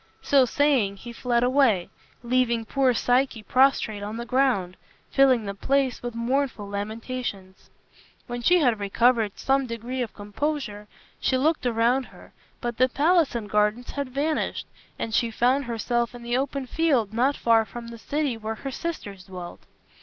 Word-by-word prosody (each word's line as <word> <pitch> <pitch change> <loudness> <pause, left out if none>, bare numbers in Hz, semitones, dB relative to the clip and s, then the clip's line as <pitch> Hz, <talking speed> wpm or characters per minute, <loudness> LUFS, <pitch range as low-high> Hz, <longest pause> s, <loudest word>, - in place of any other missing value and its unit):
So 275 -2 +5
saying, 250 -6 +2
he 235 +4 -9
fled 240 0 0
away, 250 -8 +3 0.3
leaving 235 -2 +1
poor 270 +2 +2
Psyche 245 -1 +1
prostrate 255 -5 +2
on 210 +2 -5
the 235 - -5
ground, 240 -9 +1 0.4
filling 260 -5 +4
the 200 - -3
place 270 +5 0
with 240 -1 -5
mournful 240 -2 -1
lamentations. 205 -1 -5 0.6
When 240 -1 -5
she 355 +9 +5
had 245 -10 +2
recovered 220 +1 +2
some 270 0 +1
degree 235 +2 -4
of 235 - -4
composure 210 0 -4 0.3
she 260 - +1
looked 300 -1 +1
around 240 +3 +2
her, - - -16 0.3
but 240 -1 -3
the 255 +1 +4
palace 315 +1 +2
and 225 -3 -3
gardens 210 +3 +1
had 280 -2 -4
vanished, 295 +4 -1 0.3
and 225 - -4
she 235 +2 +2
found 255 +5 +1
herself 240 +1 -1
in 240 - -10
the 240 +1 -1
open 275 +1 -1
field 255 -8 +1
not 260 +5 +2
far 225 -1 +4
from 235 +3 -9
the 230 -1 -10
city 285 +1 -1
where 220 0 -4
her 270 +5 -6
sisters 205 - -6
dwelt. 180 -2 -8
240 Hz, 160 wpm, -25 LUFS, 220-270 Hz, 0.6 s, So